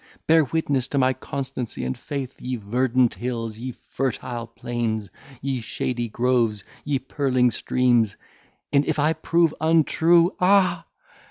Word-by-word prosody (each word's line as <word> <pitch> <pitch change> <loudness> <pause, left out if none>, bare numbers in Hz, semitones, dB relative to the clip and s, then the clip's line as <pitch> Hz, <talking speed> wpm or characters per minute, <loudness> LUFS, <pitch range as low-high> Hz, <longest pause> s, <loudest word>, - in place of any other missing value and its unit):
Bear 160 -1 +5
witness 140 -4 0
to 140 - -3
my 130 -1 +3
constancy 130 - -5
and 65 - -2
faith, 140 -3 -5
ye 130 0 -3
verdant 125 +3 +1
hills, 115 0 -4
ye 130 +2 -4
fertile 120 -2 -4
plains, 115 -3 -3 0.3
ye 135 -2 -1
shady 120 +1 -3
groves, 115 -3 +1 0.2
ye 145 -2 0
purling 130 -2 +1
streams; 120 -5 +1 0.6
and 140 0 +5
if - - -1
I 150 +2 +3
prove 165 -1 +2
untrue, 165 +2 +4
ah! 180 -3 +3
130 Hz, 135 wpm, -24 LUFS, 120-145 Hz, 0.6 s, Bear